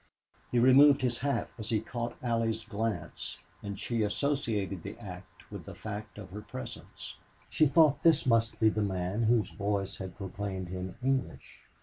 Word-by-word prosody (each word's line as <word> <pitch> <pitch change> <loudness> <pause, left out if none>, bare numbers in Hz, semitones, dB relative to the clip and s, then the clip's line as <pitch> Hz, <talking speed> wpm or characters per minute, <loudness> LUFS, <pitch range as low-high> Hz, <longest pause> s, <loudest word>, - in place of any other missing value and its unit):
He 125 - +1
removed 135 +3 +7
his 120 -2 +1
hat 140 +1 -1
as 110 +1 -5
he 110 -3 +2
caught 120 +2 -4
Allie's 115 -2 0
glance, 110 0 -3 0.2
and 100 -1 -5
she 115 -2 -1
associated 105 - 0
the - - -7
act 95 -5 -11
with - - -7
the - - -8
fact 105 0 -6
of 95 -4 -9
her 105 +2 -6
presence. 65 -10 -8 0.3
She 155 - +4
thought 150 0 +5
that 165 - +7
this 155 -2 +2
must 115 -2 +2
be 110 - +6
the 110 - -1
man 95 +1 -1
whose 115 -3 +3
voice 100 -1 -2
had 95 -2 -7
proclaimed 95 -1 -4
him 90 0 -5
English. 135 0 -2
110 Hz, 170 wpm, -31 LUFS, 100-120 Hz, 0.3 s, removed